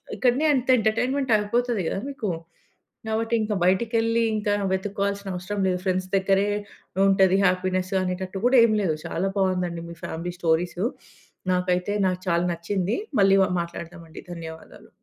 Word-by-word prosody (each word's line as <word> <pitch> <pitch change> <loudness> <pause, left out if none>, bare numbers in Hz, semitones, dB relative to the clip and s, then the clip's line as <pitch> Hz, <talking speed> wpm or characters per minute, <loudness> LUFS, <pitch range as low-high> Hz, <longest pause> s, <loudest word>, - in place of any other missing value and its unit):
ఇక్కడనే 260 +4 +2
అంత 255 -1 0
ఎంటర్టైన్మెంట్ 245 +4 0
అయిపోతాది 235 +1 0
కదా! 195 - -2
మీకు. 230 -8 -4 0.8
కాబట్టి, 225 +1 0
ఇంకా 210 -1 -1
బయటికి 190 +6 +2
వెళ్లి 230 +1 +2
ఇంకా 205 -1 0 0.2
వెతుక్కోవా‌లిసినా 200 0 -2
అవసరం 195 +3 -3
లేదు. 180 -1 0
ఫ్రెండ్స్ 185 0 0
దగ్గరే 195 +1 +2 0.6
ఉంటది 190 -1 +4
హ్యాపీనెస్ 185 +1 0
అనేటట్టు 185 +1 -3
కూడా 260 0 +4
ఏమి 215 -2 +3
లేదు. 160 -4 +1
చాలా 190 +3 -1
బాగుంది 185 -2 +1
అండి. 170 0 -6
మీ - - -9
ఫ్యామిలీ 175 +2 -4
స్టోరీసు, 175 +3 0 0.7
నాకైతే, 180 +2 0
నాకు 185 0 -2
చాలా 170 +1 +2
నచ్చింది. 185 +4 -2 0.2
మళ్ళీ‌ 195 0 +5
వ - - +2
మాట్లాడదాం 170 0 -8
అండి. - - -10
ధన్యవాదాలు. 160 -1 -10
190 Hz, 150 wpm, -25 LUFS, 180-215 Hz, 0.8 s, మళ్ళీ‌